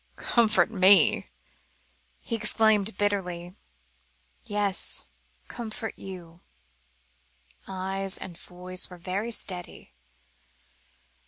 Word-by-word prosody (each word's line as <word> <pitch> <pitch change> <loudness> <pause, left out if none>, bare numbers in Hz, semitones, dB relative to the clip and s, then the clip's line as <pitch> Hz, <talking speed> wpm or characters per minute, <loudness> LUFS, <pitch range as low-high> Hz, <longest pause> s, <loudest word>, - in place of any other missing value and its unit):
"Comfort 225 -2 +3
me?" 190 -4 +5 0.9
he - - -7
exclaimed 215 -2 +3
bitterly. 180 -4 -1 0.9
"Yes, 205 -3 0 0.4
comfort 225 -2 -5
you," 175 -3 -10 1.3
eyes 190 0 -3
and 175 - -8
voice 180 +1 -4
were 180 - -11
very 190 +6 -3
steady. 180 - -2
195 Hz, 75 wpm, -27 LUFS, 180-210 Hz, 1.3 s, me